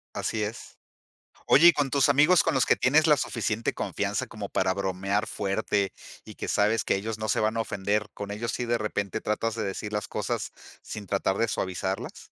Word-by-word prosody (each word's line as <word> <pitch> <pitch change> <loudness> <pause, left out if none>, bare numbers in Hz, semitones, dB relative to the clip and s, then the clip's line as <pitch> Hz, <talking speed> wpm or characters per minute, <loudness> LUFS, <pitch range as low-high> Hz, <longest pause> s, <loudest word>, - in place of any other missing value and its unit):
Así 110 -1 -1
es. 105 +2 -7 0.7
Oye, 165 +5 +7
y 170 - +8
con 145 -2 0
tus 140 -1 +4
amigos 150 +6 +5
con 165 - +1
los 130 - +3
que - - +4
tienes 150 +5 +3
la 150 -2 +5
suficiente 115 -1 -1
confianza - - -2
como - - -7
para 95 - +1
bromear 100 +1 -1
fuerte 100 -1 -1 0.3
y - - -11
que - - -5
sabes 105 +2 +2
que - - +1
ellos 110 +2 -3
no 110 0 -3
se - - +2
van 110 +1 +1
a - - +2
ofender, 105 0 -1
¿con 100 0 -6
ellos 115 +3 -3
sí 125 - -3
de 120 0 +1
repente 105 -1 -3
tratas 110 +1 -1
de 110 - -2
decir 105 +2 -4
las 105 - -2
cosas - - -3 0.3
sin 105 - -7
tratar 95 -1 0
de 115 - +2
suavizarlas? 95 -2 -4
105 Hz, 205 wpm, -27 LUFS, 100-115 Hz, 0.7 s, y